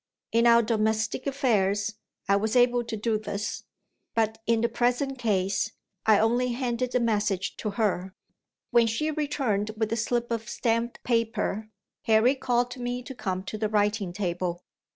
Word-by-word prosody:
In 230 +1 +4
our 235 0 +6
domestic 220 +3 0
affairs, 210 -6 +1 0.3
I 200 - +4
was 215 +3 0
able 245 -1 +4
to 230 -1 -4
do 215 0 0
this; 210 0 -4 0.5
but, 220 -1 +1
in 230 -1 +3
the 235 - +3
present 250 +3 0
case, 195 -4 0 0.3
I 215 -1 +7
only 240 +3 +2
handed 250 0 -2
the 250 - +3
message 210 -4 0
to 215 - -3
her. 195 -3 -1 0.6
When 235 -1 +5
she 305 +8 0
returned 270 -9 -1
with 220 0 0
a - - 0
slip 235 +1 -1
of 230 -1 -3
stamped 230 0 -1
paper, 225 -2 -1 0.4
Harry 225 +3 +5
called 245 -2 0
to 250 0 -7
me 245 +1 -3
to 265 - -7
come 190 -6 -3
to 210 +2 -6
the 215 -1 0
writing 205 -2 +1
table. 175 -2 -3
225 Hz, 165 wpm, -27 LUFS, 210-245 Hz, 0.6 s, I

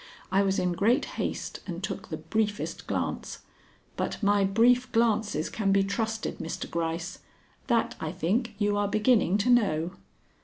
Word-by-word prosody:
I 195 +1 +4
was 195 -1 +1
in 180 - +1
great 225 - +2 0.2
haste - - -3
and - - -5
took - - -4
the - - -3
briefest 215 -2 -2
glance. - - -3 0.5
But - - -2
my 200 0 +4
brief 240 +6 +3
glances 220 -8 +1
can 200 -3 0
be 195 0 +4
trusted, 220 +2 -2
Mr. 165 - -4
Gryce. 170 +2 -3 0.5
That, 235 -3 +2
I 155 - -3
think, 205 +7 -1
you 205 -1 +1
are 205 0 +1
beginning 210 -2 +3
to 240 +5 +2
know." 180 -8 +2
205 Hz, 155 wpm, -28 LUFS, 190-225 Hz, 0.5 s, I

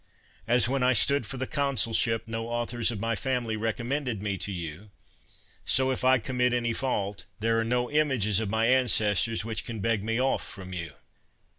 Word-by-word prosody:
As, 120 +1 +4
when 135 +1 0
I 125 +1 +4
stood 125 +1 +2
for 135 - -6
the 130 - -1
consulship, 120 -5 +1
no 115 0 -4
authors 120 0 0
of 115 -4 -3
my 115 +2 -1
family 125 -1 -1
recom 115 +2 -2
mended 130 -4 -2
me 100 0 -2
to 100 - -5
you; 85 +2 -7 0.7
so, 130 0 +2
if 130 - -3
I 130 +1 +5
commit 125 0 0
any 120 -1 0
fault, 105 -6 -2
there 115 +1 +1
are - - +1
no 120 +2 0
images 130 -10 +2
of 110 -3 -2
my 110 +2 +1
ancestors 115 -4 +3
which 115 -1 -2
can 115 -2 -6
beg 110 -1 0
me 115 +2 -1
off 135 +1 +1
from 95 -1 -9
you. 85 -2 -5
115 Hz, 190 wpm, -27 LUFS, 110-125 Hz, 0.7 s, I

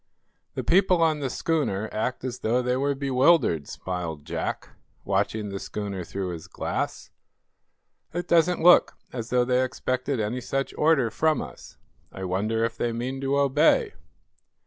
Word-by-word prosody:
"The - - -3
people 180 -1 +4
on 155 -2 +2
the 135 -2 -2
schooner 125 -9 -1
act 125 +4 -2
as 125 -1 -4
though 120 +3 +1
they 125 0 +1
were 140 +2 0
bewildered," 135 - +3
smiled 85 -5 -5
Jack, - - -4 0.4
watching 105 +2 0
the 100 0 -5
schooner 100 -3 -5
through 95 +2 -4
his 85 -3 -7
glass. - - -4 1.0
"It 175 +1 -4
doesn't 170 0 +3
look 175 0 +6 0.2
as 120 -2 -5
though 125 0 +2
they 125 0 +2
expected 130 +1 -2
any 110 +4 -2
such 135 +2 -2
order 150 -7 +3
from 155 -1 +1
us. - - -9 0.3
I 95 - -7
wonder 105 +5 0
if 115 0 -4
they 120 - 0
mean 125 +4 -4
to 135 +1 0
obey?" 150 - +3
125 Hz, 155 wpm, -26 LUFS, 105-145 Hz, 1.0 s, look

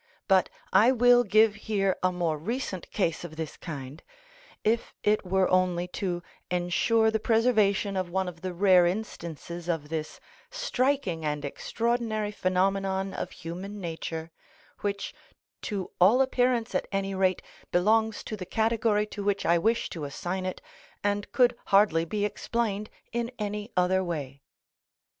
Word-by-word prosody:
But 190 -2 +4 0.2
I 215 +6 +6
will 245 -1 +5
give 215 0 +4
here 205 -3 0
a 185 - +2
more 175 -3 0
recent 190 - -4
case 170 -6 -1
of 165 -2 -8
this 160 -1 -5
kind, 145 -3 -7 0.6
if 230 +2 0
it 210 0 +2
were 190 0 +2
only 180 -1 +2
to 175 -2 -3 0.3
ensure 180 +6 +2
the 220 - 0
preservation 215 -3 +2
of 185 -2 -1
one 190 +1 -1
of 170 -2 -8
the 185 - -3
rare 180 -1 +5
instances 175 -3 -5
of 155 -3 -2
this 155 -1 -4 0.3
striking 270 - 0
and 150 -1 -2
extraordinary 225 - -1
phenomenon 195 0 0
of - - -4
human 180 +5 -7
nature, 165 -2 -5 0.5
which, 200 -1 -3 0.5
to 200 -6 -4
all 230 +9 +6
appearance 250 -3 +1
at - - 0
any 195 0 -1
rate, 190 -1 +1 0.3
belongs 220 +4 +2
to 215 - -5
the 195 - -6
category 220 +1 +1
to 210 -1 -7
which 200 0 0
I 170 0 +4
wish 225 +6 +1
to 160 -4 -5
assign 180 +6 -3
it 185 - -5 0.4
and 205 0 -1
could 245 -1 +4
hardly 195 -5 +4
be 205 +4 -1
explained 210 0 -2 0.2
in 235 0 -1
any 210 +1 -4
other 185 +1 +3
way. 140 -6 -5
195 Hz, 150 wpm, -28 LUFS, 175-220 Hz, 0.6 s, I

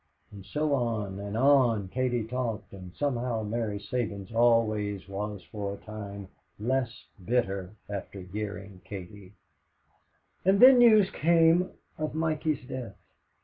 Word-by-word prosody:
And 100 -2 -10
so 150 +10 -1
on 110 -7 -1
and 100 +1 -4
on 125 -6 +4
Katie 125 0 0
talked, 115 -3 -4
and 95 -2 -9
somehow 125 -5 -1
Mary 105 -1 -2
Sabins 105 -3 -4
always 110 -4 +2
was 100 0 -5
for 100 -2 -4
a - - -18
time 100 -2 -7 0.3
less 125 +1 -1 0.2
bitter 100 -3 -1
after 100 -1 -6
hearing 100 0 -6
Katie. 95 0 -9 1.1
And 195 +2 +4
then 255 +1 +9
news 215 -5 +6
came 165 +2 +4 0.3
of 155 -1 -3
Mikey's 155 -3 -1
death. 125 -7 -6
110 Hz, 125 wpm, -28 LUFS, 100-130 Hz, 1.1 s, then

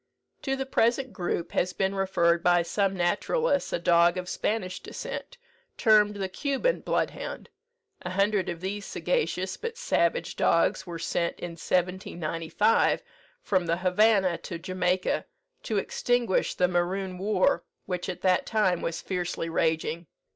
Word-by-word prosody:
To 270 - -1
the 270 0 -3
present 255 0 +1
group 175 -2 -2
has 180 0 0
been 195 0 0
referred 175 -3 +2
by 175 0 +4
some 195 +2 0
naturalists 280 - +1
a - - +1
dog 170 +1 +4
of 180 0 -4
Spanish 185 -1 -2
descent, - - -7 0.4
termed 210 -2 +4
the 195 -1 -2
Cuban 280 - 0
bloodhound. - - -3 0.5
A 180 - -5
hundred 195 0 +1
of 170 -1 -5
these 200 +2 -3
sagacious - - -1
but 465 0 -5
savage 485 - 0
dogs 170 +3 +2
were 170 -1 -5
sent, 170 +1 -2
in 175 - -5
1795, 175 +2 0 0.4
from 185 -4 +1
the 165 +1 +1
Havanna 185 0 +3
to 170 - -6
Jamaica, 185 +1 -1 0.4
to - - -2
extinguish 245 - 0
the 180 - +3
Maroon 180 +1 -1
war, 195 -1 +2 0.2
which 180 -1 -3
at 180 -1 -5
that 185 -1 +2
time 200 -6 +2
was 165 - -3
fiercely 175 -3 -3
raging. 165 0 0
185 Hz, 140 wpm, -27 LUFS, 175-210 Hz, 0.5 s, by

